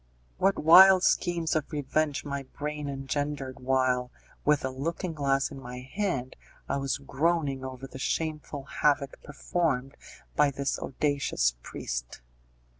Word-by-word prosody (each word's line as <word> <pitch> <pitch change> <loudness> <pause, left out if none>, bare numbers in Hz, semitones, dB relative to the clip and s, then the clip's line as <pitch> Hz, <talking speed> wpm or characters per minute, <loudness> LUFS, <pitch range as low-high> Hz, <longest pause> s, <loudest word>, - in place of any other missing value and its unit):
What 195 +1 +3
wild 185 +4 +8
schemes 170 -3 +1
of 155 0 -1
revenge 150 0 -1
my 140 -1 -3
brain 150 +2 -5
engendered 135 0 -3
while, 125 -1 +1 0.3
with 150 -2 +2
a 130 - -2
looking 165 +6 -3
glass 140 -2 +1
in 135 - -8
my 125 0 -7
hand, 135 -3 -3 0.3
I 140 - 0
was 135 -2 -1
groaning 140 -1 0
over 130 0 -6
the 130 0 -10
shameful 150 -1 -2
havoc 140 0 0
performed 140 -3 -2 0.4
by 150 -1 +4
this 140 0 -2
audacious 140 - 0
priest! - - -5
140 Hz, 130 wpm, -28 LUFS, 130-155 Hz, 0.4 s, wild